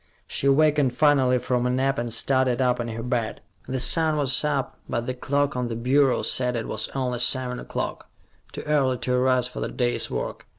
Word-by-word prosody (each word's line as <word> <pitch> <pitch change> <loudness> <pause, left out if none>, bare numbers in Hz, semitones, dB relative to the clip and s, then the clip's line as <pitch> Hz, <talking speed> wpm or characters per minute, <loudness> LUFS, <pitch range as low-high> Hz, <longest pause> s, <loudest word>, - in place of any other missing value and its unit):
She 140 - -2
awakened 145 -2 +3
finally 135 -3 +3
from 125 0 -1
a - - 0
nap, 135 +1 0
and 120 0 -3
started 130 +1 +1
up 125 -1 +1
in 120 - -3
her 115 0 -5
bed. 120 -3 -2 0.3
The 130 0 -2
sun 155 +4 +3
was 140 -1 +2
up, 140 -3 -2
but 120 0 -2
the 130 - -2
clock 145 +3 -1
on 125 -1 -1
the 115 - -4
bureau 130 +3 +2
said 125 -1 0
it 115 - -3
was 110 0 -1
only 125 -2 -2
seven 125 0 0
o'clock, - - -5 0.4
too - - -7
early 140 -4 +1
to 125 - -2
arise 125 0 +2
for 125 - -8
the - - -3
day's 120 -1 -1
work. - - -5
130 Hz, 205 wpm, -24 LUFS, 125-135 Hz, 0.4 s, awakened